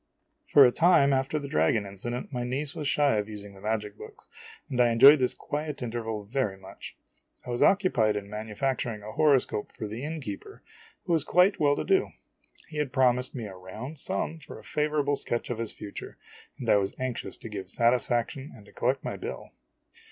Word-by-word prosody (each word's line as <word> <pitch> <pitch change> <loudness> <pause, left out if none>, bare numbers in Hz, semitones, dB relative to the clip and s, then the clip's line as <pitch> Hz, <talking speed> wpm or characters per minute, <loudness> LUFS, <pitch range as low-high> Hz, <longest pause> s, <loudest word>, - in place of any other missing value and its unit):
For 140 - +8
a 125 - +5
time 150 -3 +5
after 135 +3 0
the 145 -2 -4
dragon 100 - +2
incident, 120 +7 -6
my 125 -1 -2
niece 135 +4 -2
was 150 - -4
shy 140 -5 +3
of 105 +1 -2
using 100 -1 -9
the 95 - -15
magic 105 -1 -2
books, - - -12 0.4
and 125 -1 0
I 120 - +5
enjoyed 135 +6 +8
this 125 -1 +1
quiet 150 -2 -4
interval 115 -2 -4
very 105 -2 -2
much. 95 0 -11 0.5
I 125 - -5
was 120 - -2
occupied 155 - +3
in 100 -1 -4
manufacturing 110 +1 -3
a 110 - -7
horoscope 135 -5 +2
for - - -4
the 110 +5 -6
innkeeper, 145 -10 -6 0.4
who 175 - 0
was 160 -4 +2
quite 180 +3 +3
well 145 -1 +4
to - - -2
do. 385 0 +2 0.6
He 155 - -9
had 150 -3 -1
promised 125 -1 +2
me 120 -4 -4
a 100 - -8
round 110 +11 -8
sum 165 - -2
for 155 - -11
a - - -13
favorable 150 -1 0
sketch 120 -2 -2
ol 120 - -2
his 115 -1 -3
future, 100 - -9 0.4
and - - -6
I - - +6
was 95 -1 -1
anxious 130 -2 -4
to - - -9
give 100 -4 -6
satisfac 120 +2 +2
tion 140 +1 -9
and 105 -4 -15
to - - -17
collect 130 +3 0
my - - -4
bill. - - -7
125 Hz, 200 wpm, -28 LUFS, 105-145 Hz, 0.6 s, For